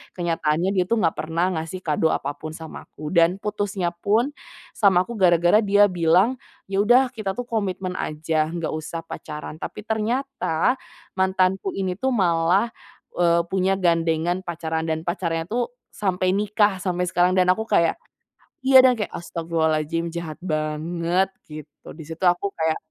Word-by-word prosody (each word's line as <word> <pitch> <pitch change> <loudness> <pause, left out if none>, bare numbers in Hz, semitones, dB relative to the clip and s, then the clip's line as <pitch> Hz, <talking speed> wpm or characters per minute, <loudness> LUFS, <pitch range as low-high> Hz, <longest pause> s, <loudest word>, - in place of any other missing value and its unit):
kenyataannya 170 0 0
dia 180 - +2
tuh 230 - +3
gak 165 - +3
pernah 165 +4 -1
ngasih 165 +4 -6
kado 155 0 +1
apapun 145 +3 -4
sama 160 -1 -9
aku 150 0 -8
dan 170 +1 +4
putusnya 205 -4 -2
pun 215 +10 +1 0.4
sama 190 -4 +3
aku 235 - -8
gara-gara 175 +2 +5
dia 205 -1 +5
bilang, 180 +8 +3 0.3
"Ya 195 - +1
udah 250 +4 +4
kita 215 -5 -4
tuh 245 - -2
komitmen 190 -4 -2
aja, 155 0 -1
nggak 170 -1 -3
usah 155 +1 -5
pacaran." 150 -1 -7
Tapi 210 - -7
ternyata 245 -1 0 0.4
mantanku 190 - +1
ini 190 -2 -1
tuh 265 - +1
malah, 180 +3 +2 0.5
eee, 170 -1 +3
punya 190 0 +2
gandengan 170 0 +1
pacaran 160 -1 -3
dan 160 0 -1
pacarnya 170 -2 -1
tuh 240 +1 0 0.2
sampai 185 -2 0
nikah 210 -1 +2
sampai 180 -1 -1
sekarang 180 +1 +2
dan 180 0 +4
aku 220 +4 -1
kayak 170 -5 +2 0.7
iya 265 -1 +8
dan 255 -1 +6
kayak 210 - -3
astaghfirullahaladzim 165 -1 -1
jahat 170 -2 -5
banget, 170 +3 -1 0.2
gitu 150 -1 -11
di 160 - -10
situ 165 +4 -4
aku 175 +3 +2
kayak 160 -1 +1
175 Hz, 150 wpm, -23 LUFS, 165-200 Hz, 0.7 s, iya